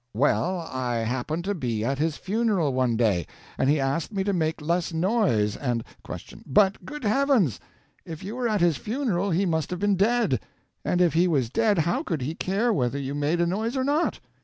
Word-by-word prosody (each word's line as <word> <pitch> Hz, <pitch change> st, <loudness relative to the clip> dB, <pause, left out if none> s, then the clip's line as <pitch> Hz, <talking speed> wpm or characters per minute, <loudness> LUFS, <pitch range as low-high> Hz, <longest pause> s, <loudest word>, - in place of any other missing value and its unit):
Well, 170 Hz, -, +1 dB
I 130 Hz, -6 st, -3 dB
happened 130 Hz, +8 st, -2 dB
to 200 Hz, +2 st, -1 dB
be 120 Hz, -, -2 dB
at 135 Hz, +2 st, -1 dB
his 155 Hz, 0 st, 0 dB
funeral 200 Hz, -, 0 dB
one 125 Hz, -3 st, +1 dB
day, 100 Hz, -8 st, +1 dB, 0.3 s
and 135 Hz, -, +1 dB
he 150 Hz, +1 st, +3 dB
asked 140 Hz, +6 st, -1 dB
me 195 Hz, -2 st, -1 dB
to 200 Hz, 0 st, 0 dB
make 160 Hz, -2 st, 0 dB
less 170 Hz, +3 st, -1 dB
noise, 165 Hz, -, +1 dB
and 120 Hz, -4 st, -2 dB, 0.2 s
Q. -, -, -9 dB
But, 195 Hz, +8 st, +3 dB
good 300 Hz, -2 st, -7 dB
heavens! 225 Hz, -, +2 dB, 0.4 s
if 160 Hz, +1 st, -8 dB
you 205 Hz, +4 st, -5 dB
were 250 Hz, -1 st, 0 dB
at 210 Hz, -4 st, +1 dB
his 170 Hz, -4 st, +3 dB
funeral, 210 Hz, -6 st, -1 dB
he 185 Hz, +3 st, +1 dB
must 160 Hz, -3 st, 0 dB
have 180 Hz, -, -3 dB
been 205 Hz, -1 st, +2 dB
dead, 210 Hz, -, +2 dB, 0.4 s
and 180 Hz, -, +1 dB
if 175 Hz, -2 st, +4 dB
he 170 Hz, +3 st, +4 dB
was 135 Hz, -9 st, +1 dB
dead 220 Hz, 0 st, +2 dB
how 170 Hz, +1 st, +1 dB
could 155 Hz, -6 st, -3 dB
he 150 Hz, +5 st, -2 dB
care 205 Hz, +7 st, 0 dB
whether 125 Hz, -5 st, 0 dB
you 140 Hz, 0 st, -3 dB
made 145 Hz, +4 st, 0 dB
a 175 Hz, -, +3 dB
noise 220 Hz, +8 st, -1 dB
or 260 Hz, -, +1 dB
not? 295 Hz, +5 st, +1 dB
170 Hz, 210 wpm, -26 LUFS, 135-205 Hz, 0.4 s, if